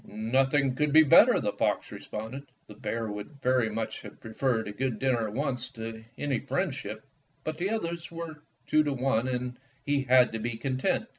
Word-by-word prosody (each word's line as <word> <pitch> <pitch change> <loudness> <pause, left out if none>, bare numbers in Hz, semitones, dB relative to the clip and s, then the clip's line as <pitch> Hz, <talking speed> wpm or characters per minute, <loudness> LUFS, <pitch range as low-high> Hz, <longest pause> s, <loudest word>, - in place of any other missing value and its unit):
"Nothing 130 +5 +1
could 150 +3 +1
be 160 +2 +8
better," 145 - +7
the - - 0
fox - - 0
re - - -7
sponded. 115 +7 -6 0.2
The 105 - -12
bear 115 +2 -3
would 105 +8 -8
very 125 -3 +3
much 110 +1 -3
have - - -11
pre 110 - -9
ferred 115 -1 0
a 105 - -5
good 120 +2 -2
dinner 120 -2 +1
at 105 - -7
once 130 -2 -1
to 115 -1 -7
any 140 -4 0
friend 170 +4 -1
ship, 110 -4 -6 0.4
but 155 0 -4
the 185 +3 0
others 170 -6 -3
were 165 -2 -7 0.2
two 155 - +4
to 145 -2 0
one, 130 -2 +1
and 125 -1 -3 0.3
he 145 -1 +2
had 125 -1 +6
to 115 - -3
be 115 +1 -3
content. 130 +1 0
130 Hz, 205 wpm, -29 LUFS, 115-145 Hz, 0.4 s, be